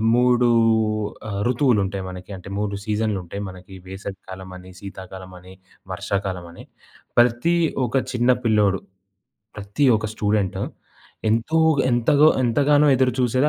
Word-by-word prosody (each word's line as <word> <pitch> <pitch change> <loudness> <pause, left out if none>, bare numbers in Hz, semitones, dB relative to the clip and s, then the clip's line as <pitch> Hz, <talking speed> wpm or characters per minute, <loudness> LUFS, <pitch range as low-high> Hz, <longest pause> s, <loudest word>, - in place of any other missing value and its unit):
3 125 0 +3 0.8
ఆహ్, 100 -1 -3
ఋతువులుంటాయి 105 -7 +1
మనకి. 90 +2 -10
అంటే 90 +2 -11
3 105 -1 -2
సీజన్‍లుంటాయి 105 -3 -2
మనకి 95 +1 -13
వేసవి 95 0 -7
కాలం 95 0 -8
అని, 90 +1 -13
శీతాకాలం 95 -1 -9
అని, 90 +1 -14 0.4
వర్షాకాలం 95 -2 -3
అని. 85 - -12 0.6
ప్రతి 120 +8 +3 0.3
ఒక 120 - -4 0.2
చిన్న 125 0 +2
పిల్లోడు, 105 -4 +2 0.8
ప్రతి 105 +8 -2
ఒక 110 - -4
స్టూడెంటు 105 -3 0 0.7
ఎంతో 115 +9 +1 0.3
ఎంతగో 130 +5 +4 0.2
ఎంతగానో 145 +5 +3
ఎదురుచూసేది 130 +1 +2
105 Hz, 115 wpm, -22 LUFS, 95-125 Hz, 0.8 s, ఎంతగో